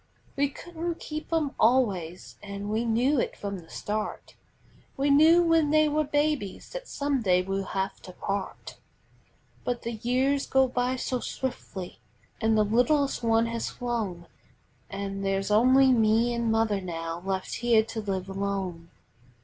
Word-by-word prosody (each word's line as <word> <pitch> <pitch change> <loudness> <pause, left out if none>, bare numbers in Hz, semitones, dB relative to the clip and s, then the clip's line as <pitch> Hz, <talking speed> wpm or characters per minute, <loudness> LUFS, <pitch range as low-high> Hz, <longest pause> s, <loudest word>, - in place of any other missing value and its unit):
We 280 0 +1
couldn't 340 +3 -5
keep 310 +1 -6
'em 315 -4 +1
always 200 -8 +1
an' 200 0 -6
we 220 +2 0
knew 245 +5 +2
it - - -2
from 200 -2 -4
the 165 - -16
start; 210 +1 -4 0.6
We 280 +1 +2
knew 320 +4 +6
when 330 -3 +3
they 310 0 +4
were 305 +1 +1
babies 290 -7 -1
that - - -7
some 280 -2 -1
day 180 -3 +3
we'd 195 +1 -2
have 190 +1 -3
to 185 - -11
part. 195 +2 -5 0.9
But 245 -1 -2
the 235 - -3
years 255 +5 0
go 265 0 +4
by 250 0 0
so 255 0 -2
swiftly, 195 - -5 0.4
an' 220 0 +3
the 215 -1 +4
littlest 270 +7 +2
one 230 -1 +3
has 230 0 -3
flown, 220 -8 -3 0.6
An' 195 0 -4
there's 195 +1 -1
only 260 +5 +6
me 225 0 +3
an' 235 -1 -1
mother 220 -3 +1
now 165 -1 -5
left 190 -1 -3
here 235 -2 +4
to 225 0 -5
live 190 -2 -3
alone. 195 -4 -3
230 Hz, 155 wpm, -27 LUFS, 195-270 Hz, 0.9 s, knew